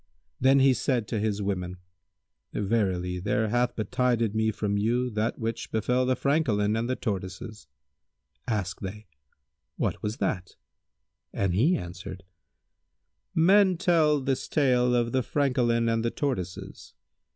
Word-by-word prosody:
Then 135 +2 +5
he 135 0 +6
said 125 -4 0
to 110 - -1
his 105 -1 -1
women, 90 -2 -3 0.8
"Verily, 95 -4 0
there 105 +3 0
hath 120 +2 +1
betided 115 0 0
me 110 0 +1
from 105 -1 -1
you 120 +4 0
that 110 +1 -1
which 115 0 -4
befel 125 +4 +1
the 130 - +2
Francolin 115 -9 +1
and 115 +2 -1
the 130 - +1
Tortoises." 100 0 -5 0.8
Asked 100 -5 -2
they, 105 +2 -6 0.7
"What - - -1
was 105 +3 -3
that?"; 95 -9 -2 0.8
and 95 -3 0
he 140 - +3
answered, 90 +2 -8 1.1
"Men 190 +2 +5
tell 160 -5 +3
this 135 -1 -2
tale 125 -4 +2
of 120 -1 +1
The 130 - +2
Francolin 120 -4 +1
and 115 0 +1
the 115 - +1
Tortoises." 100 - -4
115 Hz, 135 wpm, -27 LUFS, 100-130 Hz, 1.1 s, he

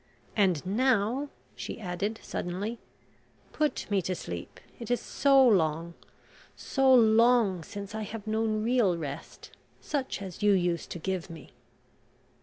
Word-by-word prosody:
And 185 -6 +2
now 245 +5 +1
" - - -35
she - - -6
added 200 +3 -3
suddenly: 200 +6 -4 0.7
"Put 305 -1 -1
me 200 -1 +2
to 185 +1 -2
sleep... 85 - -7 0.2
it 235 - -7
is 245 - +2
so 275 -2 +4
long, 165 -5 +2 0.6
so 270 -1 +2
long, 230 -5 +5
since 200 +5 -8
I 220 - -3
have 215 0 -6
known 220 0 0
real 230 -7 +2
rest, 145 -4 -7 0.3
such 275 -3 -3
as 190 +1 -8
you 205 -1 +5
used 175 -3 0
to - - -5
give 185 +1 -3
me." 165 -4 -11
205 Hz, 140 wpm, -29 LUFS, 180-235 Hz, 0.7 s, long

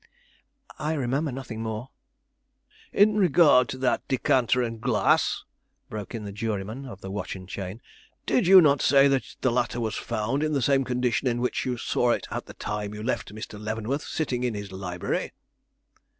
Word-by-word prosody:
"I 155 +1 -1
remember 140 +1 -1
nothing 125 -4 -6
more." 110 +3 -5 1.0
"In 210 +1 +4
regard 155 - +5
to - - -4
that 130 -1 +1
decanter 125 -1 +2
and 115 -2 -4
glass," 115 -5 +2 0.5
broke 105 +2 -6
in 110 - -5
the 100 - -5
juryman 110 +4 -4
of 100 -6 -10
the 95 - -6
watch 100 0 -4
and 95 -1 -10
chain, 95 +4 -6 0.4
"did 225 -8 +2
you 190 0 +10
not 140 -4 +4
say 140 0 +6
that 135 -1 -1
the 130 - +2
latter 120 0 0
was 110 -2 -1
found 120 +4 -2
in 155 0 0
the 140 - +1
same 135 +1 +3
condition 125 0 0
in 120 -1 0
which 125 +1 -1
you 125 -1 -1
saw 120 +1 +1
it - - -3
at - - -4
the - - -11
time 105 0 -4
you 105 - -6
left 120 -3 -2
Mr. 110 -1 -7
Leavenworth 110 +6 -2
sitting 130 -8 -2
in 120 -3 -1
his 100 -1 -6
library?" 90 -2 -3
120 Hz, 180 wpm, -26 LUFS, 105-135 Hz, 1.0 s, you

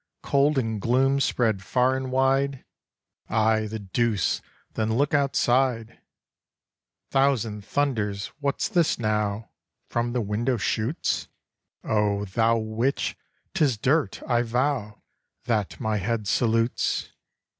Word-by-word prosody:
Cold 140 +1 +2
and 110 -5 -1
gloom 135 +4 +2
spread 110 -7 +1
far 125 +5 +2
and 130 -1 -4
wide! 135 +1 +1 0.6
Ay, 110 0 +2
the 110 +1 -5
deuce! 105 -1 0 0.3
then 110 0 0
look 145 +2 +1
outside! 130 -4 +1 1.1
Thousand 120 -7 +1
thunders! 105 -7 -1
what's 140 -1 -1
this 175 -7 +2
now 105 -1 -1 0.4
From 120 0 -1
the 125 - 0
window 115 +5 0
shoots? 115 +7 -1 0.6
Oh, 105 -1 +1
thou 115 +4 +2
witch! 110 +4 -1 0.4
'Tis 135 -7 +2
dirt, 140 +8 0
I 120 -2 +2
vow, 120 -2 -1 0.4
That 105 -4 -1
my 110 -1 0
head 105 +1 -2
salutes! 115 +1 +1
115 Hz, 115 wpm, -25 LUFS, 110-135 Hz, 1.1 s, Cold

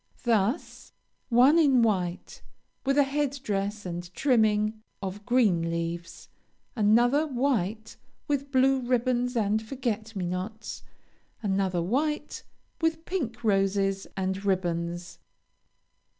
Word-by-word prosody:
Thus, 230 - 0 0.4
one 260 +7 +6
in 270 -6 +5
white, 185 -5 -1 0.5
with 275 +1 +2
a 285 - +7
head 280 0 -1
dress 205 -1 -2
and 175 0 -5
trimming 215 -4 +2 0.2
of 200 +2 -6
green 205 -10 +3
leaves; 170 0 -4 0.5
another, 240 +7 +4
white, 235 -6 -1 0.3
with 280 -1 -1
blue 265 0 +4
ribbons 250 0 0
and 215 -1 +1
forget 225 -2 -4
me 185 -2 -2
nots; 185 +5 -5 0.6
another, 190 -3 0
white, 295 - -1 0.4
with 325 0 0
pink 240 -11 -3
roses 195 -1 +1
and 190 +1 -2
ribbons. 175 -2 -2
220 Hz, 105 wpm, -27 LUFS, 190-255 Hz, 0.6 s, a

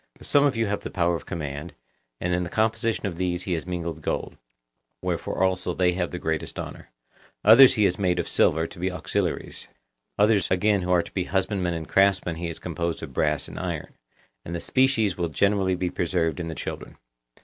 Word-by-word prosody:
Some 145 - +4
of 140 -5 +1
you 115 - +2
have 105 0 -1
the - - -6
power 85 -1 +1
of 85 - -5
command, 75 -3 -5 0.4
and 90 +1 -1
in 90 - +1
the 85 - -3
composition 110 +1 0
of 90 -4 -3
these 90 0 -1
he 95 - -2
has 80 +1 -3
mingled 85 -3 -4
gold, - - -3 0.6
wherefore - - -2
also 90 -1 0
they 90 -1 +3
have 90 -1 -1
the 90 - -5
greatest 80 -2 -3
honour; - - -7 0.6
others 130 +5 +9
he 105 - +2
has 95 -1 +2
made 90 -3 +1
of 85 - -1
silver, 80 +1 +3
to 85 - -10
be 95 +1 -1
auxiliaries; 90 -4 -2 0.5
others 105 -2 +3
again 100 +2 +2
who 90 - -4
are 90 -1 +4
to - - -13
be 90 -2 -1
husbandmen 95 -2 0
and 80 -1 -5
craftsmen 95 -4 +2
he 85 +1 -3
has 85 - -5
composed 85 -1 -3
of - - -7
brass 75 -3 0
and - - -8
iron; - - -4 0.5
and 85 - -5
the - - -2
species 115 -6 +2
will 85 -1 0
generally 95 +3 +2
be 90 0 -2
preserved 85 -3 0
in 85 - -3
the 80 - -5
children. - - -6
90 Hz, 205 wpm, -25 LUFS, 85-100 Hz, 0.6 s, others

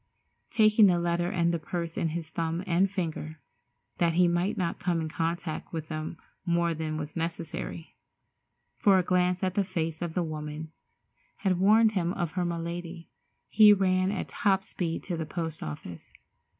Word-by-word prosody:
Taking 215 -1 +6
the 180 -2 +3
letter 175 0 0
and 170 -2 +1
the 170 - 0
purse 170 +1 -4
in - - 0
his 160 0 -4
thumb 165 +2 -2
and 185 +1 +2
finger, 160 -5 -4 0.6
that 170 -1 +3
he 180 +1 +4
might 175 +3 0
not 175 -3 -1
come 175 -2 0
in 160 -1 -3
contact 165 0 -3
with 160 -2 -5
them 155 +1 -4 0.3
more 170 -1 +1
than 155 -1 -3
was 150 -1 -6
necessary—for 170 +3 -3
a 185 - +3
glance 180 0 +1
at 185 -1 +1
the 200 - +2
face 165 -3 -3
of 170 -2 -3
the 180 - +1
woman 155 0 -5 0.7
had 185 -2 +2
warned 215 +3 +5
him 180 -4 0
of 175 -4 -2
her 180 -1 -1
malady—he 170 +5 +1
ran 185 -1 +2
at 200 - -3
top 195 -2 +1
speed 170 -4 -3
to 180 - -3
the 160 -2 -4
post 160 -1 -4
office. 80 +3 -7
170 Hz, 165 wpm, -28 LUFS, 160-185 Hz, 0.7 s, Taking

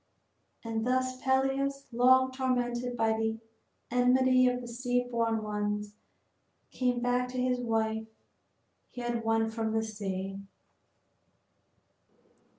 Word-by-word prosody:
And 225 -1 -2
thus 255 +1 0
Peleus, 270 +1 +1
long 260 +2 +5
tormented 245 -2 -1
by 225 -1 +2
the 220 0 -1 0.5
enmity 255 +1 +4
of 250 0 +1
the 245 - -8
sea 245 +1 -1
born 230 -2 0
ones, 210 0 -2 0.8
came 250 -1 0
back 245 +1 +1
to 255 - -6
the 250 0 +1
wife 220 -1 -1 0.8
he 245 - -8
had 240 -1 -2
won 225 0 +1
from 220 -1 -2
the 220 0 +1
sea. 195 -3 -4
245 Hz, 115 wpm, -30 LUFS, 225-255 Hz, 0.8 s, long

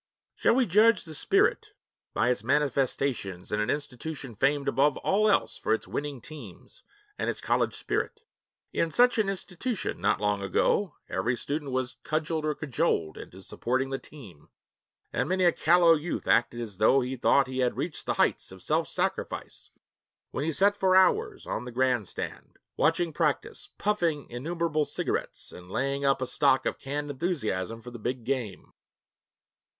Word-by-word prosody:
Shall - - +2
we 260 -1 +4
judge 210 +2 +4
the 160 - -8
spirit 420 - +2 0.4
by 125 - +2
its 120 - -2
manifestations 130 -7 0
in 105 - 0
an 105 - 0
institution 145 -2 -4
famed 140 +5 +1
above 140 +1 +3
all 215 +2 +2
else 200 - +2
for - - +2
its - - -8
winning 145 -3 -4
teams 155 +3 -10 0.4
and - - 0
its - - -3
college - - 0
spirit? 440 - -2 0.5
In 165 - +1
such 245 +6 +4
an 205 -2 +2
institution, 195 +3 -3
not - - +2
long 105 -1 0
ago, 170 - +1
every 120 +7 0
student 145 +3 -3
was 130 -1 -2
cudgeled 155 0 -1
or 150 - 0
cajoled 135 - -1
into 95 +1 -10
'supporting 130 +6 -1
the 135 - -2
team,' 105 - -14 0.6
and - - 0
many 185 0 +1
a 175 - +6
callow 170 +1 +5
youth 160 +2 -3
acted 120 0 +3
as 105 -5 -7
though 135 +5 +5
he 130 +1 -3
thought 135 +2 +4
he 130 0 -5
had 125 -1 +1
reached 165 -2 -4
the - - 0
heights - - +1
of - - -11
self - - +1
sacrifice - - -3 0.6
when 135 - -2
he 160 - 0
sat 200 +6 +3
for 190 -2 +3
hours 415 - +3
on - - -3
the 125 - -6
grandstand, 125 -4 -2 0.2
watching 165 +1 +1
practice, 150 -2 -1
puffing 170 -8 0
innumerable 155 +4 -1
cigarettes, - - -3
and 90 0 -12
laying 140 +6 -1
up 135 -1 +2
a - - 0
stock 130 +1 +2
of - - -2
canned 145 +2 -4
enthusiasm 115 - -2
for 120 - -9
the 120 - -9
big 120 +2 -3
game. 125 -5 -3
140 Hz, 165 wpm, -28 LUFS, 125-170 Hz, 0.6 s, a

